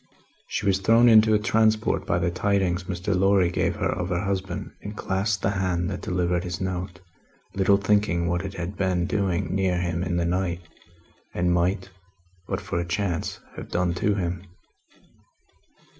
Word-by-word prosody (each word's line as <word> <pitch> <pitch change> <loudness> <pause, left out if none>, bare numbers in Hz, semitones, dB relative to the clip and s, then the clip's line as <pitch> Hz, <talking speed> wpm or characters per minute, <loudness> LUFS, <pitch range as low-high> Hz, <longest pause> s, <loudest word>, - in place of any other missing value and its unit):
She - - -3
was 95 -1 +3
thrown 115 +4 +5
into 110 -1 +6
a - - +5
transport 110 0 +1
by - - +1
the 85 - 0
tidings 95 -1 0
Mr. 95 +2 -2
Lorry 95 -1 +3
gave - - 0
her - - -1
of - - -3
her 90 -1 0
husband, 95 -2 -3
and 105 0 -7
clasped 100 +2 -1
the 100 - +2
hand 95 -2 -1
that 95 - -5
delivered 90 -1 0
his 90 0 -4
note 90 -1 -4 0.5
little 100 +1 +3
thinking 100 -4 +1
what 85 0 0
it 100 0 -6
had 90 +3 -5
been 90 -2 0
doing 95 -3 -1
near 95 -2 +1
him 85 -1 -1
in 90 -1 -1
the 85 - 0
night, 90 0 -1 0.7
and 90 0 +1
might, 90 +2 0 0.6
but - - -2
for 85 - -3
a 85 - -3
chance, 90 -2 -2
have - - -8
done 90 -1 0
to 100 +3 0
him. 90 -2 -3
95 Hz, 175 wpm, -25 LUFS, 90-100 Hz, 0.7 s, into